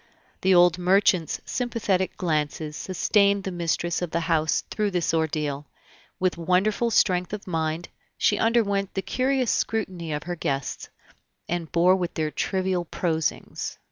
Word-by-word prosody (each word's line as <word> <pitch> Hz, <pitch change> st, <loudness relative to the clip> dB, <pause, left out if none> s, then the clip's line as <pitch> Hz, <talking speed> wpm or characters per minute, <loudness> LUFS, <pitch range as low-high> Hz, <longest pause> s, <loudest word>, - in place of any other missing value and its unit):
The 190 Hz, 0 st, +4 dB
old 175 Hz, 0 st, +5 dB
merchant's 185 Hz, -2 st, +3 dB
sympathetic 210 Hz, -7 st, -1 dB
glances 155 Hz, -2 st, -1 dB
sustained 200 Hz, +3 st, +2 dB
the 190 Hz, -, -3 dB
mistress 175 Hz, 0 st, -1 dB
of 175 Hz, -, -2 dB
the 170 Hz, -, -1 dB
house 160 Hz, -2 st, +1 dB
through 210 Hz, -1 st, 0 dB
this 180 Hz, -4 st, 0 dB
ordeal; 150 Hz, -3 st, -1 dB, 0.5 s
with 180 Hz, -2 st, 0 dB
wonderful 195 Hz, +7 st, +2 dB
strength 180 Hz, -4 st, +2 dB
of 210 Hz, -, -5 dB
mind, 160 Hz, -1 st, -2 dB, 0.3 s
she -, -, +2 dB
underwent 205 Hz, -4 st, +1 dB
the 195 Hz, -, -1 dB
curious 260 Hz, -2 st, +1 dB
scrutiny 185 Hz, -7 st, -2 dB
of 150 Hz, 0 st, -3 dB
her 175 Hz, 0 st, -4 dB
guests, 140 Hz, -4 st, -3 dB, 0.6 s
and 170 Hz, -2 st, -3 dB
bore 180 Hz, +2 st, +5 dB
with 180 Hz, -2 st, -3 dB
their 155 Hz, -1 st, -1 dB
trivial 185 Hz, 0 st, -1 dB
prosings. 160 Hz, -2 st, -2 dB
180 Hz, 140 wpm, -25 LUFS, 160-195 Hz, 0.6 s, old